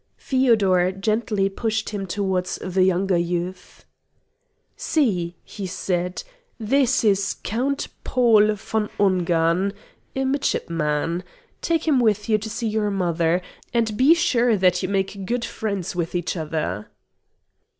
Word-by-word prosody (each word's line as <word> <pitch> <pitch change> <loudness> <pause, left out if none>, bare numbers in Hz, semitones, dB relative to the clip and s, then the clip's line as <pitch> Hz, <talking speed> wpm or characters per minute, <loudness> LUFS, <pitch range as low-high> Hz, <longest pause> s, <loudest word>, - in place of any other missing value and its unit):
Feodor 205 -9 +3
gently 210 0 0
pushed 220 +2 -2
him 200 -2 -4
towards 190 -1 -1
the 185 0 0
younger 185 0 +2
youth. 175 +1 -4 0.9
"See," 180 - 0
he 200 -3 -7
said; 180 0 -2 0.4
"this 265 +4 +2
is 200 -2 +2
Count 265 +6 -1 0.2
Paul 220 -4 +4
von 210 +1 -2
Ungern, 180 -1 +2 0.4
a 265 0 0
midshipman. 170 - -1 0.4
Take 330 -1 0
him 285 -5 +4
with 210 -3 +1
you 215 -1 +3
to 220 +1 -6
see 230 +1 -3
your 215 -1 0
mother; 175 -2 0 0.3
and 225 -2 +1
be 275 +8 +6
sure 245 -9 +2
that 180 -1 +3
you - - -2
make 195 -1 -2
good 240 0 -1
friends 200 -5 -4
with 170 0 -2
each 175 0 -1
other." 155 - -3
195 Hz, 130 wpm, -23 LUFS, 180-225 Hz, 0.9 s, be